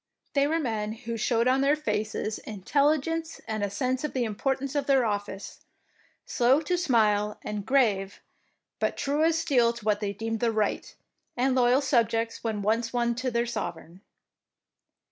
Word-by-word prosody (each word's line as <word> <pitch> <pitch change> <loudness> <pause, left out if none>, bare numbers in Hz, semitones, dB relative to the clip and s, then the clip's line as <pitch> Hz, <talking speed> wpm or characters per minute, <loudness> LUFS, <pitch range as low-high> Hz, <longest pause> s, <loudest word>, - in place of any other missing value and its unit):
They 280 0 +3
were 320 +2 +1
men 220 -6 -2
who 230 0 -6
showed 230 +1 +1
on 260 +1 +3
their 280 +2 +4
faces 215 -5 -2
intelligence 300 - 0
and 215 -1 -2
a 205 - 0
sense 255 +6 -1
of 300 - -3
the 255 - 0
importance 265 +5 -2
of 285 -2 -1
their 270 -3 +4
office, 205 -2 -4 0.6
slow 250 +4 +3
to 355 +3 0
smile 215 - +2
and 210 -1 -5
grave, 210 -8 +2 0.6
but - - -1
true 290 +2 0
as 330 0 +3
steel 260 -8 +3
to 235 -3 -11
what 210 -1 +2
they 205 -2 -2
deemed 225 +2 -3
the 235 0 +1
right, 215 -2 -1 0.4
and 260 +2 +2
loyal 255 +1 +4
subjects 230 -4 0
when 215 -3 -2
once 225 +3 0
won 235 -1 +1
to 255 +2 -2
their 235 0 0
sovereign. 175 -6 -6
235 Hz, 165 wpm, -27 LUFS, 215-270 Hz, 0.6 s, their